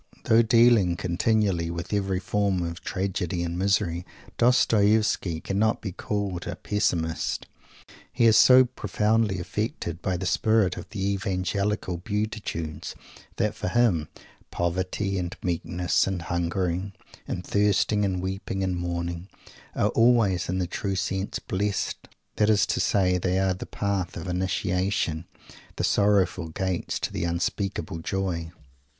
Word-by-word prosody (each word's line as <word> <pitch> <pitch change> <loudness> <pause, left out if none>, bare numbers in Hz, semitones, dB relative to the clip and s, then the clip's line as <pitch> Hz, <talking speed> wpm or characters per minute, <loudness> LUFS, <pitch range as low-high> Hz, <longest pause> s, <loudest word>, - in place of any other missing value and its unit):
Though 115 +1 +5
dealing 115 -6 +5
continually 90 -1 +1
with 85 +4 -5
every 95 -2 0
form 95 -1 0
of 85 0 -5
tragedy 90 -2 -2
and 85 0 -3
misery, 95 -2 +1 0.4
Dostoievsky 110 -7 +3
cannot 105 +3 +1
be 100 - -5
called 100 -2 -3
a 85 - -3
Pessimist. 90 -5 -1 0.7
He 120 -1 +2
is 110 -1 +6
so 130 +3 +8
profoundly 105 -2 0
affected 85 -2 -3
by 95 -2 -1
the 95 - -4
spirit 110 0 +2
of - - -8
the 100 -2 -2
Evangelical 100 -1 -1
"Beatitudes" 100 -5 -4 0.4
that - - 0
for - - -5
him 95 -7 +2 0.4
"poverty" 95 +3 -1
and 90 0 -4
"meekness" 90 +1 0
and 95 -3 -2
"hungering 85 +2 -1 0.3
and 90 0 -4
thirsting" 105 0 +2
and 95 -2 -1
"weeping 95 0 -3
and 95 -1 -1
mourning" 85 +1 -3 0.5
are - - +2
always 115 -7 +3
in 90 - 0
the 90 - 0
true 95 +2 -3
sense 95 +1 -2
"blessed" 100 +1 -2 0.3
that 105 0 +3
is 105 -2 +4
to - - -1
say, 90 -2 +2
they 90 +1 0
are 95 -1 +2
the 90 - -7
path 100 -4 -2
of 85 +2 -6
initiation, 90 -2 -1 0.5
the - - -3
sorrowful 95 -4 +2
gates 95 +2 -2
to - - -3
the - - -2
unspeakable 85 +1 -2
joy. 85 -2 -2
95 Hz, 135 wpm, -26 LUFS, 85-105 Hz, 0.7 s, so